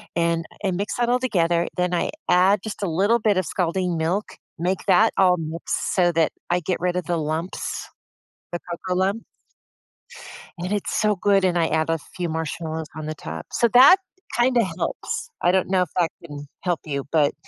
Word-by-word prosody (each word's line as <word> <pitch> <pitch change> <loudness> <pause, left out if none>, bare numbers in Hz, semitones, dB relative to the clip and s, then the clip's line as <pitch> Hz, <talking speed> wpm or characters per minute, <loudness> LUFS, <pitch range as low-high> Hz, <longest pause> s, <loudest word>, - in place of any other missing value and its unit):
And 170 -1 +1 0.2
and 190 -3 0
mix 200 +4 -3
that 240 0 +1
all 250 +1 +3
together, 175 -8 +1
then 180 0 0
I 170 - 0 0.2
add 185 +3 +5
just 215 -2 -6
a 190 - 0
little 200 +8 +2
bit 210 -3 +2
of 185 - +1
scalding 180 0 -1
milk. 175 +6 0 0.3
Make 180 +3 -1
that 215 +4 +5
all 185 -2 +5
mixed 160 +1 -3
so 175 -2 +4
that 165 -1 +2 0.2
I 175 0 +1
get 180 +3 -2
rid 180 0 0
of 180 - -1
the 175 -1 0
lumps, 160 +3 -3 0.6
the 175 - -2
cocoa 180 +1 -4
lumps. 195 +4 0 1.3
And 180 +3 -3
it's 205 - -2
so 210 -2 +2
good, 195 +1 +3
and 175 -1 +2
I 165 - +3
add 160 0 0
a 165 - +1 0.2
few 175 -1 -2
marshmallows 160 0 -4
on 155 -1 -5
the 155 - -3
top. - - -7
So, 235 - +3
that 275 +9 +9 0.4
kinda 240 -1 +4
helps. 470 - -3
I 175 - +4
don't 185 -1 +1
know 185 -1 +3
if 180 - -2
that 170 -2 +2
can 145 -2 -8 0.2
help 175 -3 0
you, 140 -2 -3
but 150 -3 +3
180 Hz, 195 wpm, -23 LUFS, 165-195 Hz, 1.3 s, that